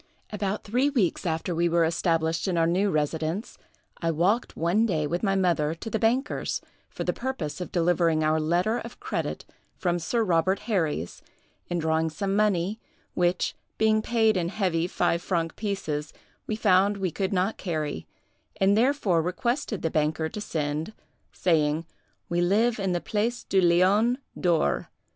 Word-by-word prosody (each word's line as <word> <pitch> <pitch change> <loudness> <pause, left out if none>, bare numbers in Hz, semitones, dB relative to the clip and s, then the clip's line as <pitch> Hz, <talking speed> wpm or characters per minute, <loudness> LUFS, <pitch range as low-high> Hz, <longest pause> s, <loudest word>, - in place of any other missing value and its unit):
"About 205 -1 -2
three 250 +7 +1
weeks 200 - 0
after 165 +2 -1
we 170 +1 +1
were 170 0 +3
established 165 0 0
in 180 -3 0
our 165 - +4
new 185 +5 +2
residence, 160 +4 -2 0.4
I 165 - +1
walked 180 +9 +1
one 185 +8 +2
day 155 -7 0
with 170 +4 -2
my 195 -2 +1
mother 165 -5 +1
to 225 +7 -7
the 220 - 0
bankers, 245 +6 0 0.3
for - - -5
the - - 0
purpose 235 - -4
of 180 - -5
delivering 170 -2 +2
our 155 +1 +2
letter 175 +9 +1
of 235 - -9
credit - - -3 0.3
from 175 -2 0
Sir 230 +7 0
Robert 185 0 +2
Herries, 160 - -2 0.5
and 175 - -1
drawing 160 0 +1
some 195 +4 -2
money, 205 0 +1 0.3
which, 175 0 +1 0.2
being 220 0 +3
paid 220 -2 +2
in 170 -1 0
heavy 175 -4 0
five 170 -1 0
franc 165 -3 -1
pieces, 155 -8 -3 0.3
we 215 - -1
found 200 -1 +3
we 190 -3 -1
could 190 +3 -2
not 190 +3 0
carry, 155 - -3 0.5
and 195 +1 +4
therefore 225 - +2
requested 220 - -2
the 160 - 0
banker 155 +1 0
to 210 - -6
send, 155 +1 -3 0.4
saying, 160 -2 +1 0.4
'We 175 0 0
live 220 +6 +2
in 190 -2 0
the 175 - -1
Place 225 +3 -1
du 195 - +2
Lion 190 +8 +4 0.2
D'or. 170 -4 +1
180 Hz, 160 wpm, -26 LUFS, 165-210 Hz, 0.5 s, our